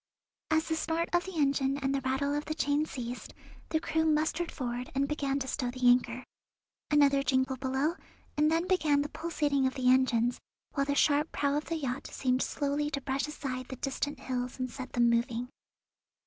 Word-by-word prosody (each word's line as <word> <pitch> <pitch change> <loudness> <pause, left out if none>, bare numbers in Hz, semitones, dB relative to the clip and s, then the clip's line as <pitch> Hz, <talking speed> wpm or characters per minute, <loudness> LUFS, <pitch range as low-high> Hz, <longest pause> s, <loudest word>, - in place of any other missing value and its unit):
As 315 0 +2
the 320 - 0
snort 325 +1 -1
of 350 0 +2
the 380 -3 -6
engine 275 -2 +2
and 270 -1 -1
the 275 - 0
rattle 270 +2 0
of 295 +1 -2
the 310 - -3
chain 295 0 +1
ceased, 245 -3 -6 0.3
the 315 - +1
crew 320 0 0
mustered 315 +2 +1
forward 245 -2 -4
and 275 +1 +2
began 280 -2 -1
to 265 -1 -3
stow 250 -1 -1
the 250 0 0
anchor. 245 0 +3 0.7
Another 285 -2 +5
jingle 260 0 +1
below, 265 +4 0 0.4
and 300 +1 +3
then 330 +2 +2
began 305 -6 +3
the 295 - -5
pulsating 295 -5 0
of 260 - -3
the 255 -2 +3
engines, 245 -2 +3 0.3
while 275 -1 0
the 285 - +1
sharp 295 +1 +3
prow 280 0 0
of 300 - -1
the 330 - -2
yacht 270 -3 -3
seemed 255 -1 0
slowly 290 +1 -1
to 280 -2 -3
brush 270 +2 -1
aside 260 -4 -5
the 260 - -6
distant 275 +2 -3
hills 250 -1 -3
and 255 -1 -3
set 260 +1 -7
them 240 -1 +4
moving. 235 +1 0
275 Hz, 195 wpm, -30 LUFS, 255-300 Hz, 0.7 s, Another